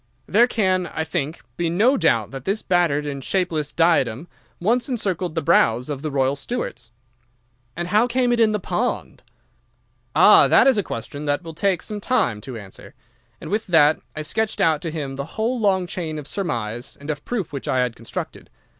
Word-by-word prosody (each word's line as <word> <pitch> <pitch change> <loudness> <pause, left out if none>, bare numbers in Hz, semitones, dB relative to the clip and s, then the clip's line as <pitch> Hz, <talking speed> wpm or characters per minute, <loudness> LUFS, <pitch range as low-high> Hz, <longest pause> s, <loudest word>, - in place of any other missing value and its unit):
There 235 +5 +4
can, 185 -6 +1
I 160 - -3
think, 160 -1 -4
be 170 -1 0
no 220 +11 +3
doubt 115 - +1
that 135 -2 -7
this 200 +7 -2
battered 170 -5 +1
and 140 -2 -5
shapeless 165 -5 -1
diadem 160 -5 +2 0.3
once 240 +9 +1
encircled 185 -8 -2
the 165 - -1
brows 120 -1 +3
of 140 -2 -4
the 155 - -3
royal 135 -1 +1
Stuarts.' 140 - -5 0.9
"'And 175 +1 -4
how 215 +5 +4
came 245 0 +1
it 240 - 0
in 225 -2 +4
the 210 - -1
pond?' 205 +7 -2 0.9
"'Ah, - - +7
that - - +5
is 265 -5 +4
a - - +3
question 145 - -6
that 145 +3 0
will 165 -1 -8
take 185 +1 0
some 210 -2 -6
time 195 - 0
to 130 -1 -7
answer.' 100 -3 -12 0.4
And - - -8
with 215 +1 -1
that 160 -3 +5 0.2
I 155 - -4
sketched 220 +8 -2
out 155 -2 +2
to 165 - -3
him 145 -4 -5
the 140 - -3
whole 235 +3 0
long 190 -4 +2
chain 165 -3 -4
of 150 - -7
surmise 120 - -4
and 145 +2 -4
of 145 -1 -6
proof 210 -11 -3
which 140 - -5
I 130 - +2
had 125 -2 -3
constructed. 115 - -7
165 Hz, 195 wpm, -22 LUFS, 140-205 Hz, 0.9 s, Ah